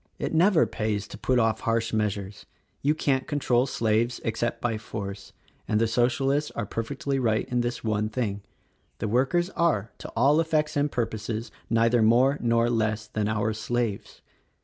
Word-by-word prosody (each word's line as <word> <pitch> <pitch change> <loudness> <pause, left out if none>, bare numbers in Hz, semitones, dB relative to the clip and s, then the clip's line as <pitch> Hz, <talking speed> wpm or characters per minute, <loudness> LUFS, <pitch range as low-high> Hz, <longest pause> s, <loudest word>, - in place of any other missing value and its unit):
It - - -3
never 175 +2 +5
pays 105 -2 -2
to - - -8
put 130 - +1
off 110 -1 +2
harsh 115 0 -1
measures. 100 -2 -2 0.3
You 150 +2 +2
can't 135 -4 0
control 130 -3 +1
slaves 115 0 0
except 115 +1 -1
by 115 -3 -1
force 100 -3 -7 0.2
— - - -37
and 105 - +1
the 115 - +3
Socialists 135 +5 +1
are 115 - -2
perfectly 135 +6 -3
right 110 -3 +1
in 125 -1 +1
this 120 0 -3
one 110 -1 0
thing: 110 -4 -2 0.6
the - - -3
workers 135 - +1
are, 130 - +1
to - - -7
all 140 +7 +4
effects 155 -1 0
and 145 0 +1
purposes, 110 -1 -3 0.2
neither 115 +1 +3
more 125 +6 +4
nor 115 0 +2
less 110 -2 0
than 105 -1 -2
our 110 0 0
slaves. 110 -1 -3
115 Hz, 170 wpm, -26 LUFS, 110-130 Hz, 0.6 s, never